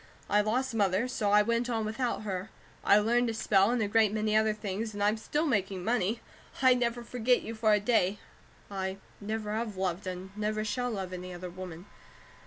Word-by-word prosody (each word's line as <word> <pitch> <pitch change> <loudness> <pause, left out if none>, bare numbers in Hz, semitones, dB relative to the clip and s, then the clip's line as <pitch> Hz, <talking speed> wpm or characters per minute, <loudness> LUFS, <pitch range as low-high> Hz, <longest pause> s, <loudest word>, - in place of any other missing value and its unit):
"I 210 - +5
lost 245 +4 0
Mother, 205 +1 +2
so 220 -5 -1
I 210 +1 +6
went 235 +2 0
on 225 -2 0
without 225 +1 -2
her. 190 0 -4 0.3
I 200 - +6
learned 240 +3 +3
to 225 - -2
spell, 195 -2 +3
and 240 -2 +1
a - - 0
great 215 0 +3
many 215 0 0
other 220 0 +4
things, 210 +1 -4
and 205 - -1
I'm 210 +1 +3
still 295 +8 -1
making 195 - 0
money. 225 0 0 0.4
I 260 -1 +6
never 240 -1 -1
forget 245 +1 +1
you 225 - -5
for 220 -1 +2
a 210 - +5
day; 205 -2 +2 0.5
I 190 -1 -3 0.2
never 210 0 -3
have 220 -3 -3
loved 185 0 -2
and 185 +1 -6
never 215 0 -1
shall 245 +3 -1
love 190 -5 -4
any 180 0 -6
other 180 0 -7
woman. 180 -1 -8
215 Hz, 200 wpm, -30 LUFS, 195-230 Hz, 0.5 s, I